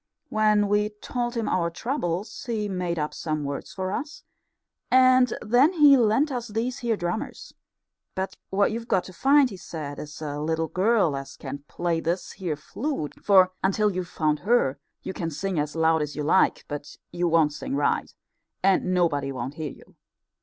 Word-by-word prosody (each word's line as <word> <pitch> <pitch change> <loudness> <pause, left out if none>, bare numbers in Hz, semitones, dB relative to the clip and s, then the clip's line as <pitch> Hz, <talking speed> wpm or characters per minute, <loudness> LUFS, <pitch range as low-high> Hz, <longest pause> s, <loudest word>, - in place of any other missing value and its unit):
When 215 -1 +3
we'd 210 +1 0
told 240 -1 -2
him 230 -2 -1
our 170 -2 +1
troubles, 180 - -3
he 220 -4 -2
made 180 -3 -2
up 150 -1 -2
some 155 -2 -3
words 140 0 -5
for 185 -1 -3
us, 295 +7 -5 0.7
and 255 -1 +5
then 255 - +4
he 295 -5 +7
lent 250 +5 +3
us 245 -2 -3
these 230 +3 -2
here 235 -3 0
drummers. 175 +4 -4 0.6
But 190 +1 -3
what 200 +2 +2
you've 230 +1 -5
got 185 -6 +2
to 185 - -11
find, 275 +6 +4
he 195 - -7
said, 150 -5 -7
is 150 0 -8
a 145 -2 -4
little 160 +1 -1
girl 195 -5 +2
as 135 0 -7
can 140 0 -7
play 170 -1 -1
this 170 +3 -2
here 180 -6 -3
flute, 215 - -5
for 190 -2 +6
until 205 +2 +2
you've 185 -1 -3
found 155 -3 0
her 195 - +2 0.2
you 190 - -4
can 170 -3 -3
sing 180 +3 -2
as 150 +1 -2
loud 160 -1 +3
as 150 -1 -3
you 150 - -3
like, 175 +6 +3
but 145 0 -7
you 175 0 0
won't 160 -3 +3
sing 145 - -4
right, 145 - 0 0.5
and 185 -1 +3
nobody 145 -6 +1
won't 130 +1 -5
hear 155 -1 -4
you. - - -17
185 Hz, 180 wpm, -25 LUFS, 155-225 Hz, 0.7 s, he